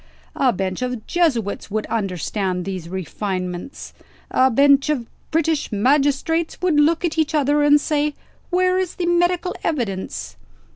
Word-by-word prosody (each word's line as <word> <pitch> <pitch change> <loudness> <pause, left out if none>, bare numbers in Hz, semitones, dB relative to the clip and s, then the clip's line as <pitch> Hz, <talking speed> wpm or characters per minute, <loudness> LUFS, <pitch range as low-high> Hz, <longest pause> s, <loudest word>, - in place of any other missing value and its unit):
A 260 -2 +3
bench 190 +1 -3
of 250 -3 -3
Jesuits 255 - 0
would 215 +1 -2
understand 190 -3 -2
these 185 -4 -5
refinements. 185 - -5 0.4
A 260 0 +4
bench 280 +3 +4
of 270 -6 0 0.2
British 320 -1 0
magistrates 285 +8 +1
would 345 -4 +2
look 330 +4 +3
at 325 -1 -1
each 315 0 +1
other, 295 0 +2
and 290 0 +5
say: 295 -1 0 0.3
Where 365 0 +2
is 370 -2 -2
the 355 - -2
medical 350 +1 +1
evidence? 225 - -3
280 Hz, 140 wpm, -21 LUFS, 205-325 Hz, 0.4 s, and